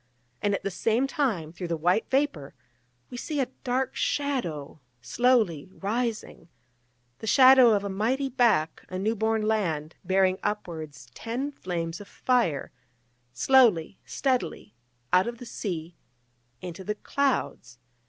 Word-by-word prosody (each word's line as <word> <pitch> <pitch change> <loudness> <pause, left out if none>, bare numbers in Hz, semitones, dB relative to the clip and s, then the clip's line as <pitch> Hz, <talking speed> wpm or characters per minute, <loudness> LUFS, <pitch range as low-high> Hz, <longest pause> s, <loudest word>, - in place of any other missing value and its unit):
and 205 -1 +1
at - - -6
the 195 - -2
same 225 +7 +1
time, 235 - -1
through 175 0 -5
the 165 -1 -2
white 175 +7 +1
vapour, 260 - -1 0.6
we 245 - -6
see 295 +3 -3
a 265 - +2 0.2
dark 255 +1 -1
shadow 175 - -2 0.2
slowly 195 - +1
rising 215 -4 -3 0.7
the 220 - -7
shadow 255 -1 +7
of 200 - -1
a - - -2
mighty 230 +8 0
back, 235 - +1
a 185 - -4
new 215 +4 0
born 220 0 0
land, 175 -8 -1
bearing 190 0 +2
upwards 160 -9 -4
ten 250 - -4
flames 170 -6 -4
of 205 - -11
fire, 235 - 0 0.6
slowly, 205 - +3
steadily, 245 - -2 0.4
out 185 +4 +5
of 235 0 -4
the 245 - -10
sea, 175 -7 -5 0.7
into 180 +1 -7
the 210 +3 -2
clouds. 245 - -2
210 Hz, 135 wpm, -27 LUFS, 170-250 Hz, 0.7 s, shadow